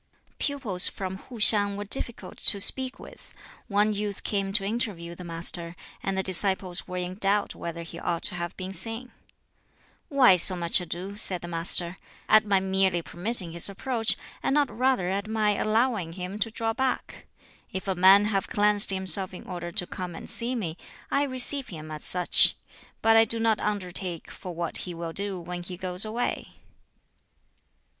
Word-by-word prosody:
Pupils 250 -11 +3
from 190 -1 -4
Hu 240 +5 -12
hiang 205 -2 +4
were 205 - -5
difficult 235 +2 +1
to 200 - +5
speak 260 +5 +4
with. - - -14 0.3
One 210 0 +2
youth 205 -1 -4
came 195 -2 -2
to 195 -1 +2
interview 200 -6 -3
the 180 - -10
Master, 170 0 -2 0.3
and 195 0 -2
the 190 - 0
disciples 190 0 +1
were 180 -1 -5
in 180 +2 -5
doubt 200 +1 +1
whether 170 0 -6
he 165 +1 -9
ought 170 -1 -2
to - - +4
have 175 0 -5
been 190 0 -6
seen. 225 +5 -4 1.0
"Why 255 -10 +5
so 185 +2 +5
much 170 +1 +2
ado," 180 +3 -6
said 185 -4 -2
the - - -6
Master, 170 +1 +1 0.3
"at 215 0 +6
my 200 -2 +3
merely 190 -2 +1
permitting 175 +4 +1
his 170 +3 +4
approach, 225 +2 -1 0.2
and 270 - 0
not 290 -3 +1
rather 255 -6 +1
at 200 +3 -2
my 215 -1 +1
allowing 215 -4 0
him 185 +3 -6
to 220 - 0
draw 225 0 -2
back? 260 +2 -3 0.4
If 190 +1 -5
a 190 - +1
man 190 +3 +6
have 200 -2 -1
cleansed 205 0 +3
himself 190 -1 +1
in - - -10
order 175 -1 -6
to 180 - -1
come 180 -1 -7
and - - -9
see 240 +2 0
me, 175 -8 -4 0.3
I 280 - +2
receive 260 +1 -2
him 155 -3 -9
as 155 -1 -7
such; 180 -1 +3 0.5
but 225 0 +5
I 225 0 +6
do 230 +1 0
not 225 -1 +2
undertake 185 -4 -4
for 180 -2 -9
what 170 0 -3
he 175 -2 -6
will 165 -1 -6
do 200 -1 -3
when 175 +1 -6
he 180 0 -7
goes 180 0 0
away." 235 +3 -3
195 Hz, 180 wpm, -26 LUFS, 180-215 Hz, 1.0 s, at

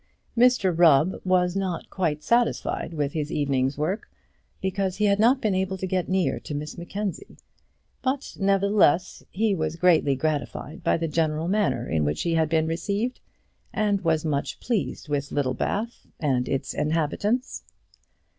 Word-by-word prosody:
Mr 235 -7 +4
Rubb 165 +1 +4
was 180 -1 +2
not 190 -3 -3
quite 155 -5 -1
satisfied 235 -5 +1
with 150 -3 -2
his 155 -1 -2
evening's 135 -2 0
work, 170 +8 -2 0.5
because 190 0 -1
he 210 +2 +1
had 200 0 +3
not 245 +5 +5
been 215 -5 0
able 190 0 -1
to 190 - -3
get 185 -2 -1
near 185 -1 +1
to 150 - -6
Miss 150 +1 -5
Mackenzie; 190 +1 -5 0.6
but, 270 +1 -2
nevertheless, 195 -3 +2
he 215 +1 +1
was 160 -3 -2
greatly 165 -5 +3
gratified 155 +4 -3
by - - +2
the 165 0 -2
general 155 0 0
manner 140 - 0
in 80 -2 0
which 75 +1 -1
he 170 - 0
had 160 -1 +2
been 160 -1 +2
received, 200 +9 -2 0.5
and 205 -3 +1
was 160 -2 +1
much 145 -3 -2
pleased 225 -8 -2
with 145 -1 -2
Littlebath 145 - -2
and 130 -5 0
its 135 0 -2
inhabitants. 165 - -1
170 Hz, 155 wpm, -25 LUFS, 150-200 Hz, 0.6 s, not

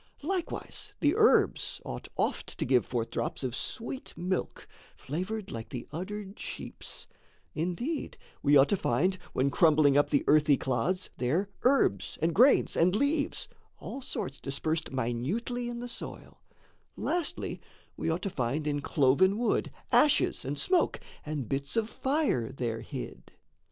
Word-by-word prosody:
Likewise 360 +2 -4
the - - +3
herbs - - +3
ought - - -6
oft - - -1
to - - -1
give 125 -2 +3
forth 115 -2 -2
drops - - -2
Of 125 -2 -2
sweet 240 - -5
milk, 185 +1 -2 0.3
flavoured 185 +8 -4
like 115 -1 -6
the 125 - -6
uddered 195 +5 -6
sheep's; - - -7 0.5
Indeed 180 - -2 0.2
we 145 0 +6
ought 135 +1 +6
to - - +3
find, 180 +5 +1
when 135 +2 +2
crumbling 150 -1 +5
up 145 - +4
The 140 - +2
earthy 150 -2 +5
clods, 135 +10 -1
there 160 +11 0
herbs, 250 - +2
and 165 +1 +1
grains, 255 - +5
and 180 +3 +4
leaves, 285 +5 +1 0.3
All 275 - -7
sorts 135 - -4
dispersed 155 +4 -2
minutely 150 - -2
in 240 0 -5
the 245 - -4
soil; 235 - -8 0.6
Lastly 350 -1 -2 0.3
we - - -2
ought 165 +3 -1
to 195 - -2
find 135 +3 -1
in 145 -1 0
cloven 155 +9 +3
wood 240 0 +1 0.2
Ashes 295 -1 +4
and 140 +2 -3
smoke 365 - +2 0.2
and 150 -5 -3
bits 140 - -2
of 225 -1 +2
fire 265 - 0
there 115 -4 -3
hid. 130 +2 -8
160 Hz, 145 wpm, -30 LUFS, 135-225 Hz, 0.6 s, we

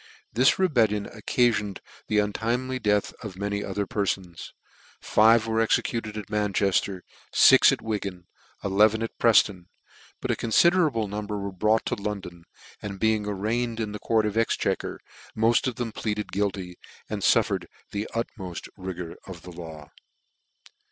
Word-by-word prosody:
This 125 +5 +4
rebellion 115 - +2
occafioned 110 -2 0 0.3
the 105 - 0
untimely 120 +5 0
th; 105 -3 +2
th - - -14
of 100 -4 -8
many 100 +1 -2
other 100 +1 -2
perfons. 95 -3 -3 0.5
Five 110 +1 +4
were 110 0 +1
executed 110 -1 0
at 105 - -6
Manchefter, 100 -2 0 0.3
fix - - +7
at - - -3
Wigan, 100 -5 -4
and - - -39 0.5
eleven 110 +2 +4
at 115 - -5
Prefton: 100 -6 +4 0.5
but - - -2
a - - +1
confiderable 145 - +3
number 105 +1 -4
were 100 0 -4
brought 110 +4 +1
to - - -1
London, 95 -5 -5 0.4
and 100 -2 -6
being 110 -2 +1
arraigned 110 +4 -1
in 110 -2 -2
the 105 - -6
court 110 0 +1
of 105 +1 -2
Exchequer, 115 - 0 0.4
mod 115 +3 +3
of 125 - -2
them 120 -3 -3
pleaded 105 -1 -3
guilty, 95 -3 -2 0.3
and - - -4
fuffered - - +2 0.2
the 105 +1 -3
ut 115 - +1
meft 90 -3 -7
rigour 90 -3 -6
of 90 -3 -9
the 90 - -9
law. 80 -3 -10
105 Hz, 150 wpm, -26 LUFS, 100-115 Hz, 0.5 s, fix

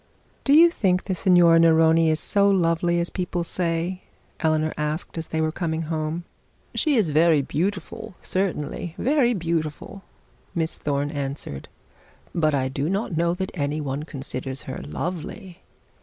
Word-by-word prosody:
'Do 280 - +4
you 335 +3 +8
think 185 - +1
the 190 - -2
Signora 175 -2 +5
Neroni 165 0 +5
is 155 0 +2
so 200 +4 +3
lovely 170 -2 +2
as 170 - -2
people 180 -1 -2
say?' 170 +1 -2 0.4
Eleanor 155 -1 +1
asked 150 +2 -3
as 165 -1 -4
they 160 - -2
were 160 0 +1
coming 165 -1 -2
home. 160 +1 -3 0.5
'She 305 -3 +2
is 205 -10 +2
very 155 -1 +4
beautiful 180 +4 -3
certainly, 175 -3 -2
very 255 -3 +2
beautiful,' 165 +2 -3 0.5
Miss 165 -1 -1
Thorne 145 0 -2
answered; 140 - -5 0.7
'but 155 -3 +2
I 130 -1 0
do 135 +3 -2
not 195 -2 -1
know 170 +1 +1
that 190 +1 -4
any 145 -2 -2
one 140 -1 -3
considers 135 -3 -5
her 130 - -6
lovely. 180 +2 -6
165 Hz, 150 wpm, -24 LUFS, 155-180 Hz, 0.7 s, you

